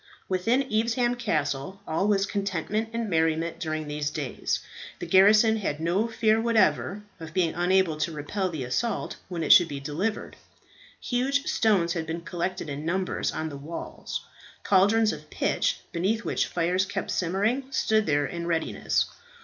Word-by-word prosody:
Within 225 +9 +1
Evesham 235 +2 +2
Castle 160 - -2
all 165 +6 0
was 200 -2 +3
contentment 200 +2 -2
and 230 -1 -2
merriment 165 -1 0
during 155 -2 -3
these 150 0 -2
days. 145 -4 -2 0.4
The - - -6
garrison 210 +5 +6
had 155 -8 -2
no 175 +7 +1
fear 225 -1 +2
whatever 220 -3 +2 0.2
of 160 -1 -9
being 175 -4 +2
unable 175 -2 +2
to 155 +2 -1
repel 165 +6 -2
the 155 -6 -4
assault 130 - -2
when 170 -3 -3
it - - +7
should 175 -4 +7
be 140 -3 -5
delivered. 165 +10 -3 0.6
Huge 275 +3 0
stones 190 -7 +2
had 160 -2 -3
been 165 +1 -3
collected 175 +1 -3
in 145 +1 -5
numbers 185 +3 -1
on 160 - -3
the 140 - -7
walls, 155 +4 -6 0.4
cauldrons 205 +3 +4
of 150 -1 -10
pitch, - - 0
beneath 205 +7 -1
which - - 0
fires 180 +2 +1
kept 200 0 -3
simmering, 205 +9 0
stood 220 -5 +2
there 145 -1 +2
in 170 +5 -5
readiness. 165 -2 0
185 Hz, 155 wpm, -26 LUFS, 160-215 Hz, 0.6 s, it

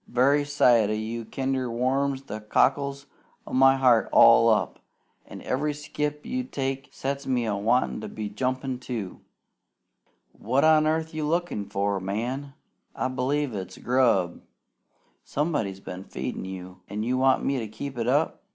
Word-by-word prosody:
Very 140 +4 +3
sight 120 -7 +4
o' - - 0
you 110 +2 -4
kinder 130 +1 -2
warms 135 +3 0
the 110 -4 -6
cockles 140 +5 +1 0.4
o' - - -9
my 135 +1 +6
heart 125 -4 +4
all 115 0 +7
up, 110 -1 +1 0.5
an' - - -10
every 145 +3 -1
skip 150 0 -4
you 255 0 -2
take 135 - -4
sets 140 +1 -4
me 125 -3 +1
a 105 -2 -1
wantin' 105 - +1
to - - -5
be 110 -1 -5
jumpin', 130 +4 -2
too. 115 -7 -6 1.1
"What 130 +6 0
on 155 -1 +5
earth 160 +1 -1
are - - -7
you 150 -1 -1
lookin' 165 - -1
for? 100 0 0
Man! 125 +9 -4 0.4
I 130 - -1
b'lieve 130 +1 -1
it's 95 -2 -6
grub! 120 -9 +1 0.8
Somebody's 140 - -2
been 95 -1 -8
feedin' - - -5
you! 95 -1 -8
An' 105 +2 -3
you 125 +3 0
want 130 0 +3
me 135 -1 0
to 110 - -4
keep 135 +5 -7
it 115 -1 -2
up? 145 +5 +1
130 Hz, 160 wpm, -26 LUFS, 110-140 Hz, 1.1 s, all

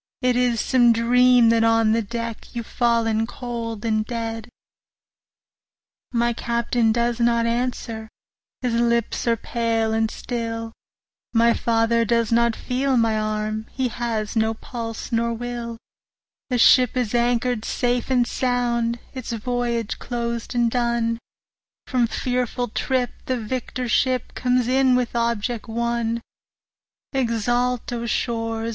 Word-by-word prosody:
It 250 -1 +3
is 245 -2 +2
some 240 -1 +4
dream 245 +1 +5
that 230 0 +3
on 225 -1 +4
the 230 +1 +2
deck 230 +1 -4
15 - - -18
You've 235 -1 -3
fallen 225 -2 +1
cold 230 -3 -5
and 215 -1 +1
dead. 225 0 -4 1.6
My 235 -1 +1
Captain 235 0 +1
does 235 +1 0
not 235 -1 +3
answer, 230 -2 -2 0.5
his 245 -2 0
lips 235 0 +1
are 230 -1 +3
pale 225 -1 -1
and 225 0 +1
still, 230 -1 -4 0.6
My 235 0 +5
father 230 0 +2
does 230 0 +1
not 235 0 +3
feel 260 +1 0
my 225 -2 +2
arm, 215 0 -2
he 260 -2 0
has 225 -2 -3
no 220 0 +1
pulse 225 -1 -6
nor 235 0 +1
will; 235 0 -5 0.7
The 250 - +1
ship 250 +1 +5
is 245 -3 -1
anchor'd 240 -1 +1
safe 245 0 -1
and 250 -2 +3
sound, 240 -2 0 0.2
its 260 -3 -6
voyage 235 -1 -2
closed 235 0 -4
and 235 -1 +2
done, 235 -1 0 0.7
From 245 -3 +1
fearful 245 +1 -2
trip 250 +2 0 0.2
the 255 -1 0
victor 250 +2 -3
ship 255 +2 +1
comes 250 -1 +1
in 260 0 +4
with 250 -1 -1
object 235 0 -1
won; 235 0 -1 0.9
20 270 -1 +2
Exult, 240 +2 0
O 235 0 -3
shores! 225 0 -1
235 Hz, 135 wpm, -23 LUFS, 225-245 Hz, 1.6 s, dream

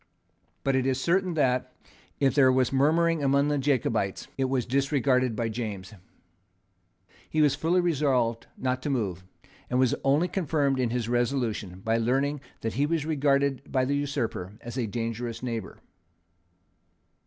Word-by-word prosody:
But 135 -1 +1
it 130 0 +1
is 130 -1 +1
certain 180 +3 +1
that, 130 -4 +1 0.5
if 135 -2 +3
there 135 -3 +5
was 130 0 +1
murmuring 160 +4 +3
among 140 +1 +3
the 145 -1 +1
Jacobites, 115 -8 0
it 135 - 0
was 130 -2 0
disregarded 130 -2 +1
by 115 +1 -1
James. 110 -3 -5 1.4
He 155 - -1
was 150 -2 +5
fully 175 +3 +1
resolved 135 -9 +1
not 130 0 -1
to 145 - -3
move, 100 -10 -2 0.5
and 125 - 0
was 130 -1 +3
only 145 +6 +3
confirmed 145 -7 0
in 125 -2 +1
his 120 -1 -2
resolution 120 -6 -1
by 115 +3 +1
learning 135 +5 0 0.2
that 115 - -2
he 140 +3 +1
was 160 -2 -1
regarded 140 -3 +1
by 130 -1 +2
the 140 +2 0
usurper 130 -10 -2
as 120 0 -8
a 125 -4 -1
dangerous 115 +2 -4
neighbour. 115 -5 -4
130 Hz, 155 wpm, -27 LUFS, 120-145 Hz, 1.4 s, there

